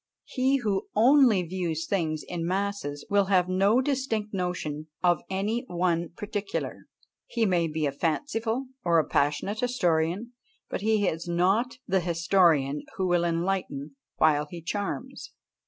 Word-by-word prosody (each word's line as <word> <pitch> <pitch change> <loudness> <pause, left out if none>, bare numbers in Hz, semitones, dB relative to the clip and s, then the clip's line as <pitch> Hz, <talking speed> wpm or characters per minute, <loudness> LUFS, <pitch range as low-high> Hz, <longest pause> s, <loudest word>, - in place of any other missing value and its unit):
He 265 +1 +1
who 210 -6 -1
only 240 -3 +5
views 170 -2 -3
things 160 -5 -1
in 175 -2 -4
masses 185 -5 -2
will 200 -1 +3
have 185 -2 +3
no 195 +6 +3
distinct 255 -6 -1
notion 180 -5 -3 0.2
of 175 -2 +3
any 205 +5 -1
one 175 -1 0
particular; 205 -1 -4 0.4
he 235 -2 0
may 175 -4 +2
be 155 -1 -2
a 140 - 0
fanciful 225 - -1 0.2
or 170 -1 +3
a 160 - +3
passionate 150 +9 0
historian, 195 -2 0 0.4
but - - -2
he 215 -1 +2
is 165 +2 -2
not 190 +9 +1
the 190 -2 +2
historian 165 -5 +2 0.2
who 190 - 0
will 175 -1 +2
enlighten 170 -5 -2 0.2
while 150 -1 +3
he 175 - -7
charms. 205 +9 -5
185 Hz, 140 wpm, -27 LUFS, 165-210 Hz, 0.4 s, only